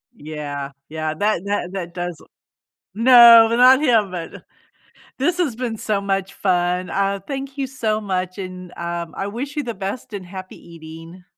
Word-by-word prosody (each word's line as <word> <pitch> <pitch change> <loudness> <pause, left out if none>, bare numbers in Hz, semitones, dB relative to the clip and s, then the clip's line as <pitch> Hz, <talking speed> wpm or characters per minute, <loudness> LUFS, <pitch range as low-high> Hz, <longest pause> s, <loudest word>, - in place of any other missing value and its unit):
Yeah, 145 -4 -6 0.2
yeah, 155 0 -3
that 205 +1 0
that 200 -3 -2
that 175 -3 -5
does 175 -3 -5 0.7
No, 235 0 +8
not 255 +2 +7
him 225 -9 +3
but 170 -2 -7 0.7
This 335 +7 0
has 295 -11 0
been 235 -3 -4
so 205 -2 -1
much 195 -1 -2
fun, 180 -1 0
aw, 195 0 0
thank 275 +1 -6
you 275 - -1
so 220 -4 -2
much, 185 -1 -3
and, 185 -2 -8
um, 170 -1 -4
I 195 - -3
wish 265 +8 -5
you 295 - -1
the 235 - -4
best 200 +5 -6
and 190 -3 -6
happy 185 +1 -9
eating. 165 +2 -12
195 Hz, 165 wpm, -21 LUFS, 175-235 Hz, 0.7 s, No